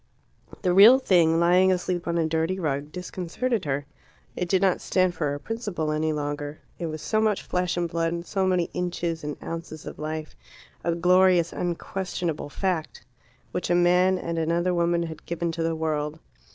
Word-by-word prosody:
The 180 - +2
real 210 +7 +9
thing, 170 -9 +3
lying 180 +2 +5
asleep 180 -1 -1
on 170 0 0
a 165 - +2
dirty 160 +3 0
rug, 145 -3 -2
disconcerted 185 +5 -3
her. 140 0 -1 0.5
It 180 - -3
did 190 - +3
not 190 -1 +2
stand 185 -1 +1
for 150 -4 -1
a - - -6
principle 205 -6 -3
any 155 +1 0
longer. 145 0 -4 0.2
It 170 - -2
was 155 -1 -6
so 215 -1 +1
much 215 -2 +1
flesh 180 -1 -1
and 175 -1 0
blood, 170 +1 -2
so 190 0 0
many 180 -2 +1
inches 175 -2 -2
and 150 0 -4
ounces 165 -2 -6
of - - -8
life 155 0 -5 0.5
a 170 0 0
glorious, 180 0 +4
unquestionable 175 -3 -3
fact, 165 -8 -3 0.5
which 180 - -3
a 175 - +3
man 180 +2 +4
and 170 -2 -3
another 170 +3 +1
woman 170 0 +1
had 160 -2 -7
given 170 0 -2
to 165 0 -4
the 165 0 0
world. 155 -1 -2
170 Hz, 180 wpm, -25 LUFS, 160-180 Hz, 0.5 s, real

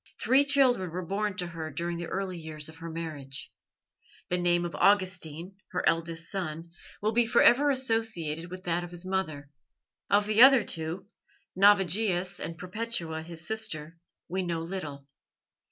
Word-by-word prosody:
Three 270 +3 +4
children 260 -9 +3
were 180 +2 -5
born 200 +1 -2
to 180 - -1
her 165 -2 -6
during 170 +4 -3
the 170 - -4
early 190 0 -3
years 155 -2 -7
of 160 0 -12
her 165 0 -7
marriage. 150 -5 -6 0.8
The 180 - 0
name 175 0 +2
of 170 - -5
Augustine, 185 -3 +1 0.2
her 180 - 0
eldest 165 0 -1
son, 165 -3 -4 0.3
will 215 - +2
be 235 +1 +3
for - - +4
ever 285 +4 +6
associated 225 - 0
with 185 +1 -8
that 175 -1 -1
of 175 - -7
his 175 +1 -7
mother. 155 -7 -3 0.6
Of 205 +1 +4
the 215 +2 +3
other 265 -3 +9
two, 165 +2 -4 0.5
Navigius 190 -2 +3
and 165 - -5
Perpetua 180 -4 -3
his 165 0 -7
sister, 165 -8 -2 0.3
we 185 +3 -2
know 170 -2 -2
little. 155 -6 -6
175 Hz, 160 wpm, -28 LUFS, 165-205 Hz, 0.8 s, other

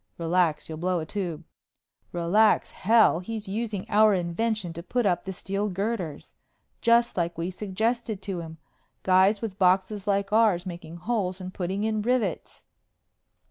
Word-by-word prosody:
"Relax. 170 -2 +1
You'll 160 -1 -7
blow 180 +1 0
a 160 - -4
tube." 175 -3 -4 0.7
"Relax 190 +6 +3
hell! 220 -4 +4
He's 215 +3 -6
using 210 -1 -3
our 215 0 +5
invention 185 +1 -2
to 170 - -7
put 245 +6 -1
up 175 -3 +1
the 190 - -3
steel 195 +2 -3
girders. 190 -5 -4 0.5
Just 235 0 +3
like 170 -1 -1
we 170 +2 -2
suggested 220 +3 -2
to 190 -3 -3
him. 160 -1 -8 0.5
Guys 190 +3 +4
with 205 -3 -5
boxes 190 +2 +2
like 200 0 0
ours 210 -5 +3
making 170 -2 -8
holes 185 0 -2
and 185 0 -7
putting 190 +3 -2
in 215 -1 0
rivets!" 230 -5 -2
190 Hz, 150 wpm, -26 LUFS, 175-215 Hz, 0.7 s, our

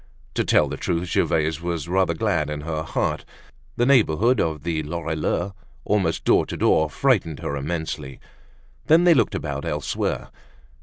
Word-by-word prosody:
To - - 0
tell - - +3
the - - -5
truth, 85 +1 -2
Gervaise 80 0 +1
was 85 -2 -3
rather 90 -1 +1
glad 85 -6 0
in 75 -1 -4
her 80 0 -3
heart; 80 - -2 0.5
the 120 - +2
neighborhood 120 - +3
of 80 -3 -2
the 80 -2 -1
Lorilleux 80 +4 -2 0.3
almost 95 -6 0
door - - +4
to - - -5
door, 80 -1 +3
frightened 95 - +1
her 70 - -3
immensely. 75 -2 -4 0.7
Then, 165 +3 +6
they 175 -1 +7
looked 130 - +2
about - - -4
elsewhere. - - -2
85 Hz, 155 wpm, -23 LUFS, 80-100 Hz, 0.7 s, they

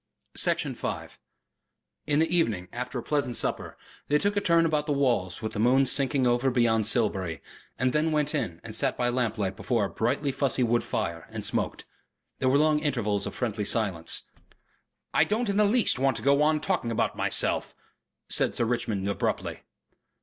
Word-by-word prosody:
Section - - +1
5 - - -6 0.9
In 145 -1 +2
the 165 +2 +2
evening, 105 - 0
after 125 +2 -4
a 120 - -4
pleasant 140 -5 -1
supper, - - -2 0.3
they 150 - +3
took 205 +6 0
a 205 - +1
turn 170 -3 +3
about 150 -2 0
the - - 0
walls 120 -10 0
with 110 0 -3
the - - -4
moon 130 +4 +4
sinking 135 0 +1
over 120 +2 +2
beyond 115 -4 +2
Silbury, 95 -8 +1 0.4
and 130 0 +1
then 155 +1 +1
went 150 -1 +1
in 85 - -2
and 115 - -8
sat - - 0
by 120 0 +1
lamplight 115 -6 -1
before 115 0 0
a - - -4
brightly 120 - 0
fussy 135 -1 +1
wood 120 0 +1
fire 85 -1 -3
and - - -4
smoked. - - -1 0.5
There 130 - +2
were 135 - +4
long 155 0 +3
intervals 120 -9 -1
of - - -7
friendly 110 -4 -2
silence. 100 -6 0 0.9
"I - - +5
don't 220 +2 -1
in 200 - 0
the 210 - +5
least 215 - +2
want 135 -2 +2
to - - -5
go 140 +1 +4
on 155 0 +2
talking 180 -11 -1
about 115 - 0
myself," - - 0 0.5
said - - +1
Sir 115 - +1
Richmond 110 -4 -1
abruptly. 100 - -2
125 Hz, 185 wpm, -27 LUFS, 110-150 Hz, 0.9 s, I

